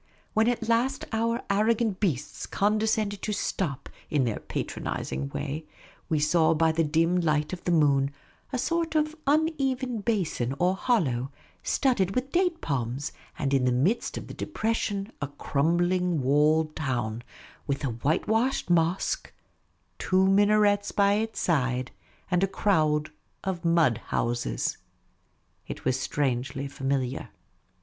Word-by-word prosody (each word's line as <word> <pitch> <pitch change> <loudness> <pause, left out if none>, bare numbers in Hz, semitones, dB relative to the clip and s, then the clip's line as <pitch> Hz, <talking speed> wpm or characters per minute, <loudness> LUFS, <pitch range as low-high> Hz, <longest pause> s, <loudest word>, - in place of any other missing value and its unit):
When 220 +1 +3
at 235 -2 0
last 245 +4 +1
our 230 +1 0
arrogant 215 0 +2
beasts 155 - -2
condescended 210 0 +1
to 215 - -2
stop, 145 -9 -2 0.2
in 145 -3 +2
their 115 -4 -1
patronising 70 +1 -4
way, 150 - -4 0.4
we 155 - +2
saw 160 +2 +3
by 160 +1 +3
the 165 +1 +1
dim 165 +3 +2
light 155 0 +1
of 180 - -6
the 175 - +1
moon 140 -4 +3 0.4
a 260 - -1
sort 330 +4 -1
of 305 0 +1
uneven 275 -5 +1
basin 175 - -1
or 180 +3 +2
hollow, 140 - 0 0.3
studded 195 -9 +1
with 255 +2 -1
date 355 -2 +1
palms, 130 0 -2 0.3
and 140 -2 -1
in 135 -2 +3
the 125 - +3
midst 155 - +1
of - - -6
the - - -9
depression 220 -5 -2
a 145 - -1
crumbling 170 +3 +1
walled 155 +3 +3
town, 120 -6 -2 0.4
with 140 +1 -1
a - - 0
whitewashed 195 - 0
mosque, 170 +2 +1 0.7
two 185 0 +3
minarets 205 +1 +4
by 200 0 +3
its 220 +2 -1
side, 130 -6 0 0.4
and 180 +1 +3
a - - +4
crowd 155 -7 +1 0.3
of 190 -3 -3
mud 165 -9 +3
houses. 120 0 -1 0.9
It - - -7
was 130 0 +1
strangely 135 0 -1
familiar. 135 -2 -2
170 Hz, 135 wpm, -27 LUFS, 140-215 Hz, 0.9 s, minarets